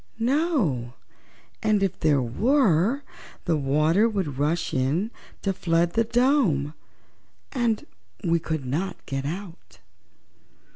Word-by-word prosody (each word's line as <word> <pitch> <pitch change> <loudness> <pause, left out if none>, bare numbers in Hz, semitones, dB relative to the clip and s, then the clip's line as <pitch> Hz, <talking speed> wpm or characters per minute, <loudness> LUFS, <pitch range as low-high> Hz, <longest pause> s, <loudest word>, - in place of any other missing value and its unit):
"No; 230 - 0 0.7
and, 215 -2 +2
if 195 -1 -1
there 145 -4 +3
were, 225 - +2 0.4
the 170 - +2
water 155 +9 +3
would 175 - -3
rush 155 +4 0
in 150 - 0 0.3
to 195 - +1
flood 170 -1 +1
the 230 - +3
dome, 230 - +2 0.8
and 235 -5 0 0.4
we 170 0 +2
could 155 -4 -3
not 160 +10 -3
get 135 0 -3
out." 180 +2 -7
175 Hz, 110 wpm, -25 LUFS, 145-225 Hz, 0.8 s, there